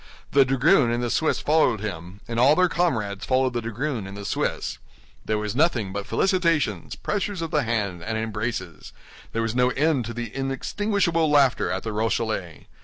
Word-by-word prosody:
The 140 -1 +5
dragoon 135 +1 +4
and 120 +1 -1
the 120 - -1
Swiss 160 - +1
followed 150 -7 +3
him, 95 -2 -6
and 115 0 -2
all 135 +5 +6
their 185 +1 +4
comrades 110 - -1
followed 130 -1 +1
the 120 - -1
dragoon 115 -1 -3
and 100 +1 -9
the 100 - -7
Swiss. - - -2 0.5
There 110 - 0
was 105 +1 -3
nothing 125 - +1
but 100 0 -4
felicitations, 165 - +1
pressures 205 -3 -2
of 165 - -5
the 150 - +2
hand, 105 -7 -2
and 110 +2 -2
embraces; 110 -6 -4 0.4
there 115 - -1
was 115 -1 -1
no 125 0 +3
end 140 -2 +1
to 115 - -5
the 120 -2 -5
inextinguishable 165 +5 0
laughter 140 -3 +3
at 95 +1 -2
the 110 - -3
Rochellais. 110 -5 -2
120 Hz, 180 wpm, -24 LUFS, 105-150 Hz, 0.5 s, all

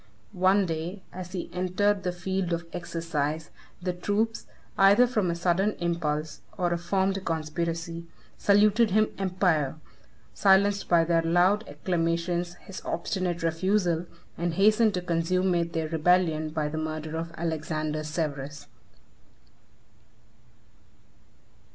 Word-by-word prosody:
One 190 +1 +3
day, 170 +3 -4
as 180 0 -7
he 180 - -4
entered 185 +3 +1
the 180 -1 -1
field 185 0 -2
of 170 0 -2
exercise, 160 -3 -3 0.3
the 180 -1 -1
troops, 210 +5 -1 0.3
either 200 +5 +6
from 215 -7 0
a 170 - 0
sudden 180 +4 +1
impulse, 160 -3 -2 0.2
or 175 -2 +1
a - - 0
formed 190 +2 0
conspiracy, 165 +1 -3 0.3
saluted 210 +3 +4
him 215 +2 +2
emperor, 180 -7 +1 0.6
silenced 200 +1 +3
by 170 -1 +5
their 165 0 +2
loud 180 +6 +3
acclamations 170 +2 -1
his 195 - -9
obstinate 180 -3 -2
refusal, 175 0 +1 0.3
and 170 -1 -1
hastened 215 +2 +4
to 180 - -2
consummate 170 0 0
their 160 -2 -1
rebellion 160 -1 +2
by 155 -1 -2
the 155 +1 -3
murder 155 0 -4
of 165 +1 -4
Alexander 155 -1 -2
Severus. 150 -2 -4
175 Hz, 120 wpm, -27 LUFS, 165-190 Hz, 0.6 s, either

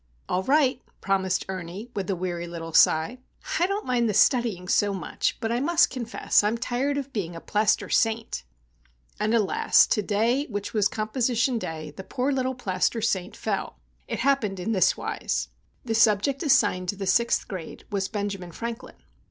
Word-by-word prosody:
"All 185 - 0
right," 265 +2 +2 0.2
promised 190 -1 0
Ernie, 190 +5 -6
with 195 -2 -3
a 195 - +1
weary 175 -1 -4
little 165 -1 -7
sigh. 165 +10 +4 0.4
"I 350 - +3
don't 400 +2 -2
mind 240 -3 +1
the 210 - -1
studying 215 -5 +2
so 200 +1 +2
much; 185 - -2
but 225 -1 -2
I 235 - +1
must 335 +5 +3
confess 235 -4 +1
I'm 215 +3 +1
tired 255 +4 -1
of 275 -1 -5
being 175 -6 -3
a - - -6
plaster 210 +4 +1
saint!" 225 -1 0 0.8
And, 215 +1 +1
alas! 210 -4 +4
to 210 - +1
day, 230 +8 +1
which 205 -2 -5
was 210 -2 +3
composition 235 +3 0
day, 155 -5 -6
the 190 - -7
poor 260 +6 -1
little 260 -1 -1
plaster 200 -1 0
saint 205 -3 -1
fell! - - -3 0.3
It - - -3
happened 230 -9 +1
in 205 +5 -2
this 190 -4 +3
wise. - - -2 0.4
The 225 - -1
subject 225 +5 +3
assigned 205 - +2
the 200 0 -3
Sixth 235 +5 +2
Grade 180 -5 -7
was 195 -2 -1
Benjamin 200 -4 -4
Franklin. 235 +2 -6
215 Hz, 170 wpm, -26 LUFS, 190-245 Hz, 0.8 s, sigh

